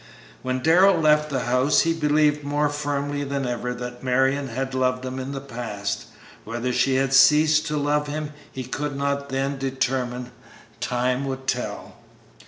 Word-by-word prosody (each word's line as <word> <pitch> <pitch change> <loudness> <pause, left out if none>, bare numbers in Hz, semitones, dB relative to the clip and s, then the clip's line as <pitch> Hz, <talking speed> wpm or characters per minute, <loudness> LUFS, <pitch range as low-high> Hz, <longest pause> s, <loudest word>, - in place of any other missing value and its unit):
When 130 0 -2
Darrell 180 +3 +5
left 150 -1 +3
the 135 -3 -1
house 125 +4 +3
he 165 - +1
believed 150 -1 +2
more 145 +1 0
firmly 145 -1 -2
than 140 -1 -2
ever 125 0 -2
that 125 0 -7
Marion 135 +2 +1
had 130 +2 -4
loved 130 0 0
him 130 +1 -4
in 130 +1 -5
the 140 - -4
past. 115 -6 -5 0.4
Whether 120 +3 -3
she 130 +1 +2
had 135 0 +1
ceased 150 +3 +5
to 150 - -1
love 150 +1 +1
him 150 0 -4 0.2
he 130 - -5
could 145 +3 -4
not 140 0 -1
then 135 +1 -2
determine; 130 -2 -2 0.5
time 125 +2 0
would 130 -1 -5
tell. 125 -2 -3
135 Hz, 165 wpm, -24 LUFS, 125-145 Hz, 0.5 s, Darrell